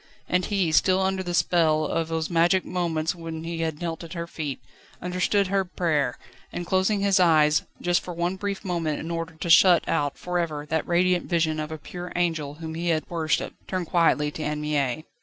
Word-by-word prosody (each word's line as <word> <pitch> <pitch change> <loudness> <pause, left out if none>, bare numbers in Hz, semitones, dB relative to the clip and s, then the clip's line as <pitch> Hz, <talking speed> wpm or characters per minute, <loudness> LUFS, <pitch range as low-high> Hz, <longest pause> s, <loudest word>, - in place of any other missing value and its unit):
And 180 0 +1
he, 195 -6 0
still 185 +4 +4
under 190 0 0
the 175 -1 -3
spell 160 -4 +3
of 165 +2 -1
those 160 -1 -2
magic 175 +2 +2
moments 165 -3 -1
when 165 -2 -7
he 165 0 -4
had 160 -2 -2
knelt 165 -1 -4
at 165 - -8
her 170 -1 -4
feet, 150 -5 -5 0.4
understood 180 +3 +1
her 195 +1 +1
prayer, 160 -8 -1 0.3
and 175 - -4
closing 190 +3 +1
his 200 -1 +3
eyes 155 -3 +4 0.2
just 175 0 +1
for 180 - -7
one 175 +2 -1
brief 200 0 -4
moment 165 -5 -1
in 165 - -5
order 165 -1 -4
to 165 +2 -5
shut 175 0 +6
out 145 -3 0
for 180 0 -2
ever 155 -3 -3
that 160 0 -2
radiant 180 +1 +2
vision 160 -3 +1
of 155 0 -4
a 160 - -4
pure 175 +4 -8
angel 160 -5 -1
whom 160 0 -7
he 170 +2 -3
had 160 -2 0
worshipped, 160 -2 -2
turned 185 -2 -2
quietly 160 -3 +2
to 155 - -7
Anne 150 0 -2
Mie. 150 -1 -1
170 Hz, 205 wpm, -25 LUFS, 155-180 Hz, 0.4 s, shut